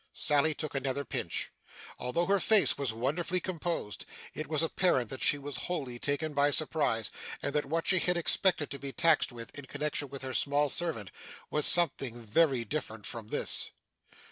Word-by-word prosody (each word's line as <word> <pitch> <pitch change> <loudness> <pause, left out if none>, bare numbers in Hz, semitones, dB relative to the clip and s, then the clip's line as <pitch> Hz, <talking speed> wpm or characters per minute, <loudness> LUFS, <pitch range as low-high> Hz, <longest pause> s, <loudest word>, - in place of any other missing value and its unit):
Sally 150 +1 +2
took 155 0 -4
another 135 0 -1
pinch. - - -2 0.5
Although 145 +8 0
her 200 +2 +3
face 215 +3 +4
was 140 -5 -1
wonderfully 155 +10 -1
composed, 170 - -3 0.3
it 155 - -4
was 155 +1 +1
apparent 160 - +1
that 130 - -5
she 145 - +4
was 140 -2 -6
wholly 135 -9 -3
taken 145 +3 -1
by 145 0 +4
surprise, 145 -7 +1 0.3
and 140 - -3
that 150 -2 0
what 165 +3 -1
she 185 - +4
had 180 0 +1
expected 175 -1 +1
to 140 - -5
be 140 0 -5
taxed 160 0 +3
with, 115 -1 -9
in 145 - -7
connection 145 0 -2
with 135 0 -7
her 130 -1 -4
small 145 +2 +2
servant, 135 - -2 0.4
was 150 -1 +4
something 135 -8 +3
very 120 +2 +2
different 110 -4 -4
from 115 -3 -5
this. - - -2
145 Hz, 175 wpm, -31 LUFS, 130-165 Hz, 0.5 s, face